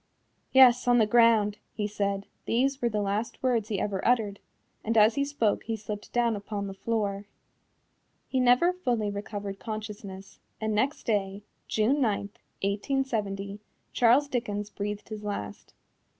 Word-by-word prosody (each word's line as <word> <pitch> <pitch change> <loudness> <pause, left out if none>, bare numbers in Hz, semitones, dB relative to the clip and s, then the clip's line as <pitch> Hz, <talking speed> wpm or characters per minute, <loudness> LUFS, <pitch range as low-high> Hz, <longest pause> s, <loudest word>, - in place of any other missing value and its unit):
"Yes, 250 -2 +6
on 245 0 +5
the 220 - +5
ground," 220 -2 +4 0.2
he 210 - -1
said 200 -1 -2 0.2
these 270 +3 +1
were 240 - +2
the 210 -2 -1
last 205 +6 -3
words 235 -4 +1
he 205 -3 -1
ever 195 -1 -2
uttered 220 -5 +1 0.4
and 225 +1 0
as 215 +1 +6
he 280 - 0
spoke 280 -7 0
he 225 - -2
slipped 210 -1 -7
down 235 -2 +2
upon 205 0 -4
the 195 - -5
floor. 205 -1 -2 1.0
He 260 - 0
never 250 +8 +4
fully 240 - -1
recovered 200 -1 -5
consciousness, 210 -3 -7 0.2
and 220 0 -1
next 260 +8 0
day, 200 -3 -1 0.2
June 245 +7 +2
9, 215 -5 +2 0.4
1870, 205 -2 -2 0.3
Charles 250 +5 +4
Dickens 210 -6 -3
breathed 205 +1 -5
his 215 -1 -6
last. 100 - -6
215 Hz, 150 wpm, -28 LUFS, 205-240 Hz, 1.0 s, Yes